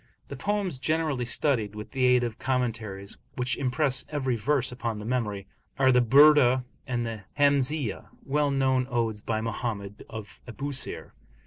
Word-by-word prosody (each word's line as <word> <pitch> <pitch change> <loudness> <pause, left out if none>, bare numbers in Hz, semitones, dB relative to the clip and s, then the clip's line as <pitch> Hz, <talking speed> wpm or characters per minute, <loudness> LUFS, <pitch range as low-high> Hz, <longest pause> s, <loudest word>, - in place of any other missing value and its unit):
The 140 - -5
poems 195 -1 -2
generally 155 -4 0
studied, 115 -5 +1
with 105 0 -8
the 130 -2 +1
aid 125 -1 +4
of 115 -2 -4
commentaries, 115 -6 -2 0.2
which 125 -1 -1
impress 130 0 +1
every 135 -5 -1
verse 130 +3 +1
upon 115 -3 -3
the 105 - -7
memory, 110 -5 -2 0.3
are 130 -1 +5
the 125 0 +5
Burdah 130 0 +6 0.2
and 120 -2 -1
the 110 -3 -6
Hamziyah, 140 -3 +2 0.2
well 145 +1 +1
known 130 -2 +1
odes 115 -4 -1
by 110 0 -2
Mohammed 110 -3 -4
of 110 -2 -9
Abusir. 140 +3 -4
125 Hz, 150 wpm, -27 LUFS, 115-140 Hz, 0.3 s, Burdah